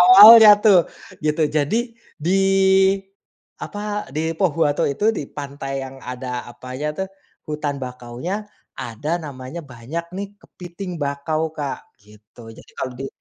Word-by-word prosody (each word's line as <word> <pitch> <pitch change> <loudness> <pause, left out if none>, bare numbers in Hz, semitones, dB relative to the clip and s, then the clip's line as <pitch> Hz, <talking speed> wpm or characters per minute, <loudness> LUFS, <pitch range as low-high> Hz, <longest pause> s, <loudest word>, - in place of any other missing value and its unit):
awalnya 225 - +10
tuh, 200 -6 +4 0.3
gitu. 155 0 +1
Jadi 220 - -1 0.2
di 180 +6 +1 1.2
apa, 205 -5 -5
di 160 +3 -2
Pohuwato 160 -5 +1
itu, 210 +10 +1
di - - -3
pantai 140 -1 -5
yang 135 0 -11
ada 125 0 -5
apanya 130 +4 -7
tuh, 190 - -1 0.4
hutan 150 -2 -3
bakaunya, 125 +7 -5 0.4
ada 120 +7 -5
namanya 140 +3 -7
banyak 135 +6 -6
nih, 200 +1 -4
kepiting 175 0 -8
bakau 155 +3 -2
Kak 145 -3 -5 0.2
gitu. 105 +2 -16
Jadi 110 - -15
kalau 130 - -3
di 135 - -4
150 Hz, 125 wpm, -21 LUFS, 130-180 Hz, 1.2 s, awalnya